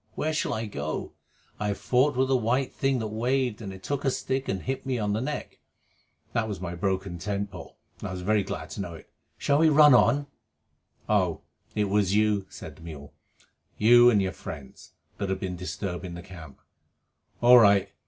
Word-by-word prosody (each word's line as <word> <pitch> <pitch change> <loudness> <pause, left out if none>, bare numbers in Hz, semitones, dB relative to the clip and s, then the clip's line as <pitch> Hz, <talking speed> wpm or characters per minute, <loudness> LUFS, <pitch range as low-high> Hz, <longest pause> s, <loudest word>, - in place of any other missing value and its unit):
Where 155 +1 -1
shall 160 0 -1
I 110 +1 -3
go? 80 -7 -4 0.5
I 105 - -1
have 100 - -1
fought 130 +2 +2
with 130 +1 +2
a - - +5
white 125 +2 0
thing 135 -1 +1
that 110 -3 -3
waved, 120 +1 -1
and 100 -3 -6
it 95 0 -11
took 145 -2 -2
a 135 - +2
stick 130 +1 -2
and 95 -1 -2
hit 135 +1 -3
me 130 -2 -1
on 105 -2 -1
the 110 - -1
neck." 150 +3 -5 0.7
(That 115 -1 0
was 100 -4 -5
my 90 -1 -5
broken 95 0 -2
tent 100 +1 -3
pole, 90 -4 -11 0.2
and - - -5
I - - -6
was 90 -1 -5
very 105 +2 +2
glad - - -6
to - - -5
know 90 -3 -6
it.) - - -15 0.3
"Shall 140 0 +2
we 160 0 +5
run 150 -1 +7
on?" 125 +5 +4 0.8
"Oh, 95 -6 +1 0.3
it 105 - +2
was 100 -1 +1
you," 105 -2 +2
said - - -10
the - - -17
mule, 75 -3 -10 0.6
"you 120 +3 +7
and 110 -4 +4
your 95 - -1
friends, 70 -7 -10 0.3
that 100 - -2
have 95 0 -1
been 95 -2 -4
disturbing 90 0 -5
the 85 - -8
camp? 85 -8 -12 0.8
All 125 +1 +8
right. 100 -3 +4
105 Hz, 205 wpm, -27 LUFS, 95-125 Hz, 0.8 s, All